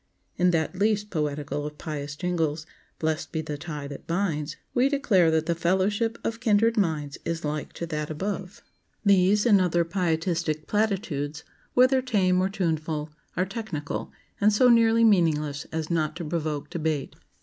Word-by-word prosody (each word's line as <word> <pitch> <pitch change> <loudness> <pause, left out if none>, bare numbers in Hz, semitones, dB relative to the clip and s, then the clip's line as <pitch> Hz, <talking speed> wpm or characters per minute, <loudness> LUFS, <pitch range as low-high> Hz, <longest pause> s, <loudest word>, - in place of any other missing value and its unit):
In 180 0 +3
that 165 +1 0
least 210 0 +1
poetical 150 -2 -2
of 150 0 -6
pious 145 -2 -5
jingles,— 160 -3 -1 0.3
"Blest 160 0 -2
be 160 - -1
the 150 - -4
tie 150 -1 -6
that 140 -1 -9
binds,"— 160 -4 -1 0.2
we 255 +3 +3
declare 215 - +3
that 160 0 +1
"The 170 - +1
fellowship 190 +7 +1
of 230 0 -2
kindred 225 0 +3
minds 155 -8 -1
Is 165 -1 -3
like 150 0 -3
to 170 - -4
that 150 -2 -3
above." 190 +4 -4 0.4
These 200 +2 +4
and 205 -5 +6
other 175 -1 +2
Pietistic 165 -3 -1
platitudes, 190 -9 -1 0.3
whether 255 +1 +5
tame 190 -7 +2
or 190 - +1
tuneful, 160 -5 -2 0.3
are 185 - +2
technical, 195 -8 -5 0.3
and 210 +1 +5
so 245 +4 +5
nearly 230 -1 +5
meaningless 155 -9 +2
as 160 0 -3
not 155 -2 0
to 170 -1 -5
provoke 155 -2 -3
debate. 155 -4 -2
170 Hz, 160 wpm, -26 LUFS, 155-200 Hz, 0.4 s, and